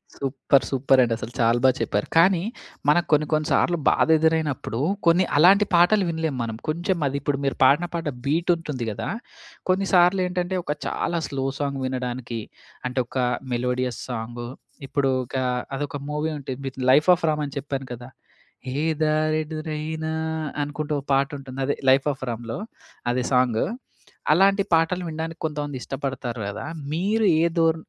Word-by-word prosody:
Super! 135 0 +1
సూపరండి. 130 -3 +3
అసలు 115 - -7
చాలా 115 +1 +3
బా 130 - +7
చెప్పారు. 105 - -1
కానీ 175 +1 +5 0.5
మనకు 175 +3 +3
కొన్ని 150 0 +4
కొన్ని 155 0 +1
సార్లు 175 - +3
బాధ - - +3
ఎదురైనప్పుడు 155 -7 0 0.3
కొన్ని 170 +2 +5
అలాంటి 195 +6 +6
పాటలు 180 +4 +5
వినలేం 160 -4 -2
మనం. 115 -1 -4
కొంచెం 175 +4 0
అది 140 +1 -2
ఇప్పుడు 140 -1 0
మీరు 135 - 0
పాడిన 145 +7 +5
పాట 165 -3 -2 0.2
బీట్ 160 +5 0
ఉంటుంది 150 -7 -5
గదా! 110 +3 -4 0.6
కొన్నిసార్లు 185 -1 +4
ఏంటంటే 180 +1 -2
ఒక 150 - -1
చాలా 170 0 -1
స్లో 135 -1 -3
సాంగ్ 140 -1 -2
వినడానికి 125 -2 -3 0.5
అంటే 125 +1 -2
ఒక 130 - -6 0.4
మెలోడియస్ 125 0 -1
సాంగ్. 120 0 -5 0.4
ఇప్పుడు 135 -1 +1 0.2
ఒక 130 - -10 0.4
అదొక 145 +2 -3
మూవీ 150 +1 -1
ఉంటుంది. 135 -1 -5 0.2
'లైఫ్ 150 +6 +5
ఆఫ్ 165 - -3
రామ్' 150 -1 0
అని 140 - -10
చెప్పాను 135 -1 -4
కదా. 120 +1 -9 0.8
ఎదారె 155 0 +1
దురైన 155 0 -4 0.6
అనుకుంటూ 150 +1 -4
ఒక 135 - -17
పాట 135 0 +2
ఉంటుంది. 135 -1 -9
అదే 145 - +1 0.2
'లైఫ్ 135 +2 +4
ఆఫ్ 135 - -22
రామ్‌లో.' 115 - -5 0.5
అది 125 +1 0
సాంగ్. 125 -3 +3 0.7
అలాంటి 195 +4 +5
పాటలు 165 +3 +2
వినడానికి 160 +1 -5
కొంతమంది 145 -2 -4
ఇష్టపడతారు 130 -4 -4
గదా. 100 - -5 0.3
మీరు 205 +7 +1 0.2
ఏ - - +4
ధోర 165 -1 +4
145 Hz, 150 wpm, -24 LUFS, 130-165 Hz, 0.8 s, బా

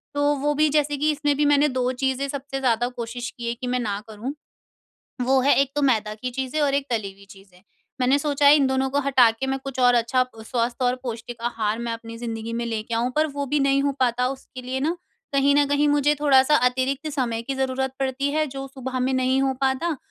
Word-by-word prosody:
तो 290 0 +2
वो 295 +2 0
भी 305 +1 +3
जैसे 290 -1 +1
कि 300 +2 +1
इसमें 290 -1 0
भी 295 - +2
मैंने 290 +1 +4
2 255 0 0
चीज़ें 265 +1 -1
सबसे 275 0 -5
ज़्यादा 240 -2 +1
कोशिश 245 0 -5
की 235 - -5
है 235 - 0
कि 250 +1 -7
मैं 250 0 0
ना 205 -3 -2
करूँ। 225 +6 -5 0.9
वो 265 0 +4
है 280 +2 +4
एक 275 -1 +1
तो 290 - +1
मैदा 215 -5 +1
की 250 +4 -5
चीज़ें 265 +4 -3
और 280 -1 +2
एक 280 0 0
तली 210 -4 -2
हुई 200 +1 -18
चीज़ें। 195 -2 -17 0.4
मैंने 260 +3 +3
सोचा 285 -1 +1
है, 290 - +9
इन 275 -2 +3
दोनों 265 0 0
को 285 - +1
हटा 265 -4 +5
के 225 +4 -4
मैं 270 0 -1
कुछ 270 -1 -6
और 245 0 +5
अच्छा 240 +2 +2 0.2
स्वास्थ्य 240 +2 -2
और 250 0 +2
पौष्टिक 235 -1 -6
आहार 225 -2 -1
मैं 235 -1 -3
अपनी 230 0 -8
ज़िन्दगी 230 -1 -5
में 235 0 -2
लेके 225 0 -3
आऊँ। 240 +2 0
पर 310 +1 +3
वो 285 -1 -4
भी 290 +2 0
नहीं 275 0 +3
हो 280 0 +1
पाता 250 0 +2
उसके 260 -1 -8
लिए 260 +1 -3
ना, 325 +5 0 0.4
कहीं 280 +1 +3
न 290 0 +4
कहीं 290 +1 +2
मुझे 290 0 +3
थोड़ा-सा 280 0 +5
अतिरिक्त 265 +4 -2
समय 235 -4 -1
की 270 +3 -4
ज़रूरत 265 0 -1
पड़ती 270 +1 -1
है। 310 0 +1
जो 270 0 -6
सुबह 260 -1 -4
में 260 +1 +1
नहीं 260 +1 +2
हो 265 -1 +1
पाता। 270 +4 0
265 Hz, 235 wpm, -23 LUFS, 240-280 Hz, 0.9 s, है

